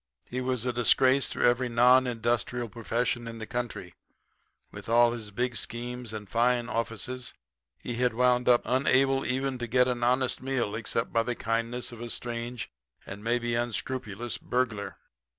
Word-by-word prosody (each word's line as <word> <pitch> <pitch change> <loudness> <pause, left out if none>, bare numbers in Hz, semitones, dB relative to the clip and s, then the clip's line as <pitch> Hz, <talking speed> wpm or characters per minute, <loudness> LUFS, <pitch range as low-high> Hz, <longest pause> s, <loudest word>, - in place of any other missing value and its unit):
He 125 +1 -4
was 125 -2 -1
a 125 - 0
disgrace 130 +3 +4
to - - -2
every 120 +1 +3
non 125 +2 +5
industrial 120 +1 -1
profession 120 +1 -2
in 115 0 -7
the 110 - -6
country. 120 -7 -4 0.8
With 105 +1 -9
all 120 +1 +5
his 115 -3 -6
big 120 +4 -2
schemes 120 0 -3
and 105 -2 -6
fine 120 +3 +1
offices 115 +2 -3 0.4
he 120 - -5
had 120 -1 +1
wound 125 0 +3
up 120 -1 +5
unable 135 +1 +3
even 130 0 -1
to 120 - -3
get 125 +2 +3
an 125 -1 -1
honest 125 +1 +1
meal 130 -5 -1
except 115 +1 -2
by 115 - +4
the 120 +1 -2
kindness 115 +2 -2
of 120 -1 -10
a 120 - -5
strange 120 0 -4 0.4
and 100 +2 -8
maybe 120 +1 0
unscrupulous 120 -1 -2
burglar. 120 -5 -2
120 Hz, 165 wpm, -28 LUFS, 115-125 Hz, 0.8 s, non